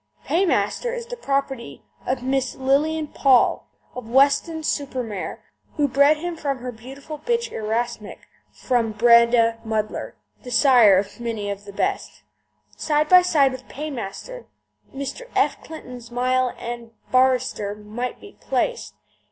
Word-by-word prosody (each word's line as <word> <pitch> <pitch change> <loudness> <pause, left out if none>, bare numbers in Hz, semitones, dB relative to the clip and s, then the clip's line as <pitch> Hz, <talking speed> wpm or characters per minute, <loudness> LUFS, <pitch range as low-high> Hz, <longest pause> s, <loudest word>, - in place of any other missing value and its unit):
Paymaster 375 - +1
is 475 -1 -5
the - - -7
property 275 - -3 0.2
of 255 0 -1
Miss 265 -1 -1
Lilian 295 +4 +1
Paull, 265 -3 +3 0.3
of 250 -3 -8
Weston 285 +5 +3
super 275 -4 -2
Mare, 210 -5 -6 0.3
who 295 -2 +2
bred 280 +3 +4
him 345 +2 -4
from 285 -4 -2
her 250 0 -6
beautiful 270 +6 -10
bitch 470 +5 -1
Erasmic, 220 -1 -3 0.3
from 235 -4 -1
Breda 235 0 +5
Muddler, 215 -1 -3 0.3
the 250 - -9
sire 235 -5 +6
of 200 +5 -3
many 225 -4 -3
of 200 0 -7
the 200 - -9
best. 390 - -3 0.5
Side 300 0 0
by 365 0 +8
side 295 -7 +3
with 260 0 -9
Paymaster, 300 - -7 0.4
Mr. 280 - -6
F. - - +1
Clifton's 250 -7 -10
Mile 255 +1 0
End 235 -1 -7 0.2
Barrister 255 -5 +2
might 215 +4 -6
be 405 - -14
placed. - - -2
255 Hz, 135 wpm, -23 LUFS, 235-300 Hz, 0.5 s, by